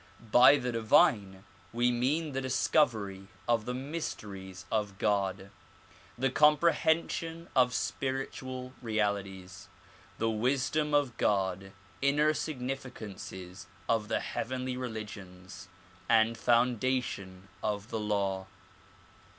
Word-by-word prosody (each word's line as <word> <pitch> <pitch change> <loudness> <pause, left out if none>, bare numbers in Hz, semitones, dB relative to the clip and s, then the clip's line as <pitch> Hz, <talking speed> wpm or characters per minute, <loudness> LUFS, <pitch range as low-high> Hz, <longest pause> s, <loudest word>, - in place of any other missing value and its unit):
By 125 +4 +8
the 125 -2 -2
divine 105 -4 +3 0.3
we 120 +1 +2
mean 145 +6 0
the 135 0 -2
discovery 115 -7 +1 0.2
of 115 -2 +2
the 125 - -3
mysteries 105 - -6
of 105 -3 -1
God, 100 -1 0 0.7
the 130 +1 +1
comprehension 165 +2 +2
of 125 -1 +5
spiritual 130 -1 -3
realities, 100 -4 -2 0.5
the 115 - 0
wisdom 135 +6 +1
of 140 -5 +1
God, 95 -1 0 0.3
inner 145 +3 +3
significances 125 - -6 0.2
of 110 -2 +1
the - - 0
heavenly 130 +1 -3
religions 105 -6 -7 0.4
and 115 0 +4
foundation 120 -5 0
of 105 +1 -2
the 110 - -2
law. 100 -3 -1
115 Hz, 100 wpm, -30 LUFS, 100-130 Hz, 0.7 s, By